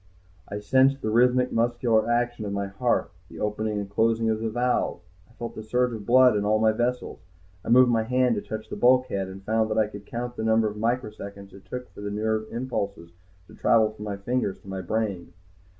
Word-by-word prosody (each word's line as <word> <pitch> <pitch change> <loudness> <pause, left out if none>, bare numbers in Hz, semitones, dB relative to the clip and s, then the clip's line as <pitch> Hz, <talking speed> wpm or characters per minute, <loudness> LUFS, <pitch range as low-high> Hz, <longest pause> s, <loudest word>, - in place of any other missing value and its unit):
I 100 - -4
sensed 135 +6 +3
the 110 - -1
rhythmic 125 +2 +3
muscular 115 -1 +1
action 120 -1 0
of 100 - -4
my 100 0 -2
heart, 100 0 -1 0.2
the - - -11
opening 105 0 -2
and 100 -1 -3
closing 115 +2 +1
of 110 - -1
the 115 0 -2
valves. 120 -6 -1 0.2
I - - -22
felt 120 -1 -6
the - - -7
surge 125 +3 0
of 105 -3 -7
blood 125 -1 +6
in 105 - 0
all 105 +1 +2
my 110 0 +3
vessels. 120 +3 -2 0.4
I - - -6
moved 125 +1 +6
my 115 -1 +2
hand 125 +2 +2
to 105 - -2
touch 110 +1 -6
the - - -5
bulkhead, 125 -6 +2
and 95 +1 -10
found 110 +1 +1
that 110 - -1
I 110 - +4
could 100 -1 -10
count 120 +1 -5
the - - -3
number 110 0 +3
of 105 - -5
microseconds 105 -4 -4
it 95 - -14
took 125 0 -6
for - - -10
the 105 - -4
nerve 110 +1 -1
impulses 100 -8 -4 0.3
to - - -17
travel 110 -2 +3
from 105 0 -9
my 100 -1 -4
fingers 100 -1 -2
to - - -18
my 95 -1 -4
brain. 100 -2 -3
110 Hz, 220 wpm, -25 LUFS, 105-120 Hz, 0.4 s, blood